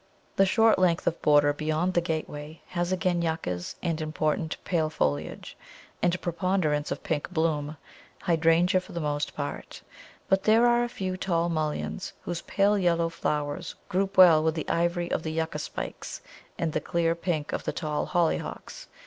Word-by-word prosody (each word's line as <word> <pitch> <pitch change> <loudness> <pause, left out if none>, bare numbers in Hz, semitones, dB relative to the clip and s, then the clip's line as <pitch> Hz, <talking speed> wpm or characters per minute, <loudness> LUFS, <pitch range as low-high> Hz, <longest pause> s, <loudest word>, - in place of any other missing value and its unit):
The 195 - +4
short 225 +2 +4
length 175 -2 +2
of 165 - -1
border 145 -1 +5
beyond 155 +4 -1
the 175 - +3
gateway 155 -2 -5
has 175 0 -1
again 180 -1 +1
Yuccas 125 - -3
and 165 -2 -1
important 155 0 -1
pale 160 -3 +1
foliage, 70 - -2 0.5
and 175 0 +2
a - - -3
preponderance 175 -4 0
of - - -4
pink 150 -3 -2
bloom, 155 -3 -1 0.5
Hydrangea 170 +2 +3
for - - -13
the 170 - -3
most 145 -2 -2
part; 145 -1 -6 0.4
but 190 0 +2
there 225 +2 +5
are 240 0 +4
a 240 - -2
few 185 -6 -3
tall 170 -2 0
Mulleins, 150 - -2
whose 170 -1 -4
pale 205 +1 +2
yellow 170 -2 +2
flowers 150 +1 -3
group 195 +2 -1
well 170 -4 +8
with 160 0 +1
the 160 - -4
ivory 175 +1 0
of - - 0
the 160 -1 -4
Yucca 160 0 -2
spikes - - -6 0.4
and 165 -2 -1
the 155 - 0
clear 165 -1 +1
pink 170 -3 -2
of - - -3
the - - 0
tall 150 -3 -2
Hollyhocks. 175 -3 -2
165 Hz, 170 wpm, -27 LUFS, 155-180 Hz, 0.5 s, well